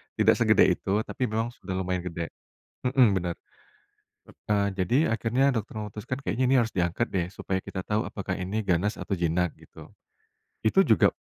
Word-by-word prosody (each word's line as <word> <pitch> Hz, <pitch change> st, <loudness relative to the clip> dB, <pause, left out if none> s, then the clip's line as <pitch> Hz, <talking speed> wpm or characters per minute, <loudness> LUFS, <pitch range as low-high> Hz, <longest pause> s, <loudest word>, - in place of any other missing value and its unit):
tidak -, -, +4 dB
segede -, -, +5 dB, 0.2 s
itu 105 Hz, +3 st, 0 dB
tapi 125 Hz, -, -2 dB
memang 115 Hz, +2 st, -1 dB
sudah 95 Hz, -5 st, -6 dB
lumayan 90 Hz, -1 st, -2 dB
gede, 85 Hz, -1 st, -4 dB, 0.5 s
mhm, 125 Hz, -6 st, +4 dB
benar. 85 Hz, -1 st, -2 dB, 1.2 s
Nah 100 Hz, -1 st, +2 dB
jadi 120 Hz, -, +2 dB
akhirnya 125 Hz, +4 st, +2 dB
dokter 110 Hz, -1 st, -3 dB
memutuskan 105 Hz, +4 st, -5 dB
kayaknya 130 Hz, -2 st, -1 dB
ini 135 Hz, -, +5 dB
harus 115 Hz, -2 st, +1 dB
diangkat 90 Hz, +6 st, 0 dB
deh 90 Hz, -3 st, +1 dB
supaya 95 Hz, 0 st, -3 dB
kita 95 Hz, -1 st, -6 dB
tahu 105 Hz, +1 st, +1 dB
apakah 95 Hz, -2 st, -4 dB
ini 95 Hz, +4 st, -3 dB
ganas 95 Hz, +5 st, +1 dB
atau 100 Hz, -, -2 dB
jinak 85 Hz, 0 st, 0 dB
gitu, -, -, -14 dB, 0.8 s
itu 110 Hz, -, +5 dB
juga -, -, +4 dB
100 Hz, 165 wpm, -27 LUFS, 90-115 Hz, 1.2 s, segede